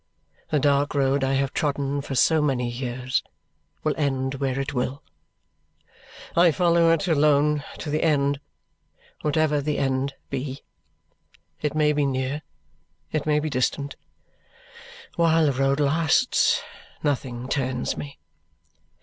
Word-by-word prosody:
The 155 - +2
dark 145 +1 +2
road 135 0 +2
I 135 0 +1
have 135 0 0
trodden 140 -1 -1
for 140 -1 -5
so 160 +4 +4
many 130 -4 0
years 125 +1 -2 0.6
will 155 - +1
end 135 -3 0
where 135 -1 0
it 135 - -3
will. 130 +2 -2 1.3
I 170 +1 +6
follow 170 0 +3
it 165 +3 +1
alone 150 -1 +3
to 150 - -5
the 155 - 0
end, 140 -3 +2 0.8
whatever 150 -1 +1
the 150 +1 -1
end 135 0 -1 0.2
be. 135 0 -4 1.0
It 150 0 -1
may 150 -1 +3
be 145 -1 +1
near, 130 +2 -2 0.7
it 155 -1 -2
may 150 0 +3
be 155 0 -3
distant; 140 +2 -1 1.2
while 165 -1 +4
the 140 - +2
road 135 +2 +1
lasts, 160 - +2 0.4
nothing 130 -4 -2
turns 130 -2 -1
me." 140 -1 -7
140 Hz, 130 wpm, -24 LUFS, 135-150 Hz, 1.3 s, I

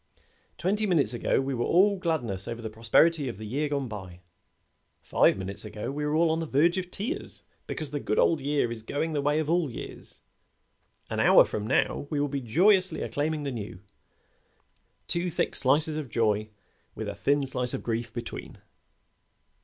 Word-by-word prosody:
Twenty 210 +4 0
minutes 150 - +3
ago 120 - +1
we 135 0 -1
were 120 -1 -1
all 200 +4 +4
gladness 120 - -2
over 120 0 -5
the 110 -2 -6
prosperity 135 +8 +3
of 115 - -7
the 110 - -7
year 145 +7 -1
gone 140 -2 -1
by. 95 -5 -8 0.8
Five - - +3
minutes 95 +1 -5
ago 105 +3 -5
we 150 +2 -4
were 150 +1 0
all 165 0 +3
on 160 - 0
the 165 - -3
verge 170 +7 +3
of 180 -1 -6
tears 240 - -5 0.2
because 155 -4 -5
the 145 - -2
good 105 - -2
old 160 -4 +3
year 140 -3 0
is 115 -1 -6
going 150 +8 -2
the 145 - 0
way 145 +1 +1
of 155 -1 0
all 170 -2 +1
years. 120 - -9 0.9
An - - -2
hour - - +7
from 105 0 -4
now 135 +3 +1
we 150 - -1
will 145 - +1
be 140 -1 -3
joyously 185 - +3
acclaiming 150 +1 -2
the 140 - -2
new. 105 -6 -6 1.3
Two 175 +1 0
thick 170 - -1
slices 150 +4 +3
of 150 -5 -5
joy 110 -2 +1 0.5
with - - -5
a - - -3
thin 140 0 +1
slice 125 -2 -2
of - - -6
grief 115 0 -2
between." - - -7
145 Hz, 185 wpm, -27 LUFS, 115-160 Hz, 1.3 s, hour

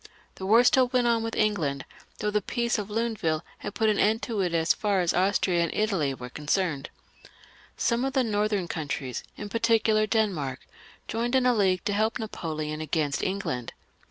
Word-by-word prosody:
The 190 - -6
war 225 +4 +7
stiU 250 0 +4
went 250 -2 +2
on 230 -1 +3
with 225 0 -3
England, 160 -11 0 0.3
though 210 0 -1
the 210 0 +1
peace 235 +2 -1
of 205 0 -5
Luneville 210 -8 -1 0.2
had 205 - -6
put 220 - +2
an 210 -1 +2
end 220 +2 +2
to 220 -5 -1
it 180 -2 0
as 165 0 +2
far 205 -3 0
as 175 - +1
Austria 185 -1 +2
and 170 - 0
Italy 195 -10 +1
were 125 -1 -8
concerned. 150 0 -1 0.9
Some 235 +1 +1
of 270 0 -1
the 265 -1 +3
northern 210 -4 0
countries, 140 -5 -4
in 210 - -5
particular 220 -1 +2
Denmark, 180 - 0 0.5
joined 235 +3 -1
in 260 -1 +3
a 250 - +5
league 190 -5 +1
to 205 - 0
help 220 +2 +1
Napoleon 155 -7 -4
against 150 -2 -1
England. 185 - -3
205 Hz, 185 wpm, -27 LUFS, 165-225 Hz, 0.9 s, war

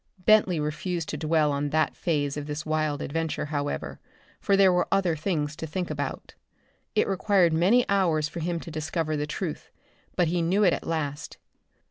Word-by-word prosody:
Bentley 190 -3 +4
refused 160 +3 -3
to - - -3
dwell 155 -1 +2
on 145 +1 -1
that 155 +2 +1
phase 145 -5 -1
of 150 0 -5
this 150 +1 -4
wild 155 -2 -1
adventure 160 +1 -2
however, 145 -1 -3 0.4
for 200 -1 +2
there 190 -2 +6
were 180 - +1
other 185 -4 +2
things 155 -2 -2
to 160 - -5
think 175 +2 -3
about. 145 -2 -5 0.6
It - - +3
required 190 -3 +3
many 205 +10 +3
hours 170 -6 +2
for 170 - -7
him 170 +1 -2
to 165 - -9
discover 155 0 -2
the 150 0 -2
truth, 155 +1 -5 0.5
but 175 - +2
he 175 +1 0
knew 185 +5 +2
it 180 -4 +5
at - - -4
last. 145 -3 -3
160 Hz, 180 wpm, -26 LUFS, 150-180 Hz, 0.6 s, there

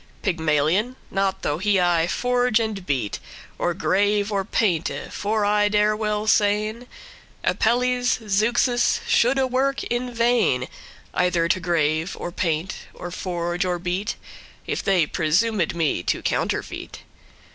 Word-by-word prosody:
Pygmalion? 165 - +1 0.2
not 195 -1 -1
though 145 +2 -1
he 200 0 +2
aye 175 -2 +2
forge 245 +2 +1
and 215 -5 -3
beat, 125 -8 -1 0.4
Or 175 - 0
grave 205 +3 +1
or 200 -1 0
painte: 185 -5 -1
for 210 +1 0
I 205 0 +3
dare 210 0 +2
well 210 -1 -1
sayn, 215 +3 +1 0.6
Apelles, 245 0 +2
Zeuxis, 240 +4 +2
shoulde 260 +2 +2
work 275 +2 +1
in 245 +1 -2
vain, 230 - +2 0.5
Either 180 -2 +1
to 185 - +1
grave, 165 -1 0
or 175 - -4
paint, 170 +2 -2 0.2
or 175 - -7
forge, 175 -1 -2
or 180 -1 -1
beat, 180 +4 -2 0.5
If - - -2
they 185 -5 +3
presumed 175 +5 +1
me 160 - 0
to - - -2
counterfeit. - - -3
200 Hz, 130 wpm, -23 LUFS, 175-225 Hz, 0.6 s, I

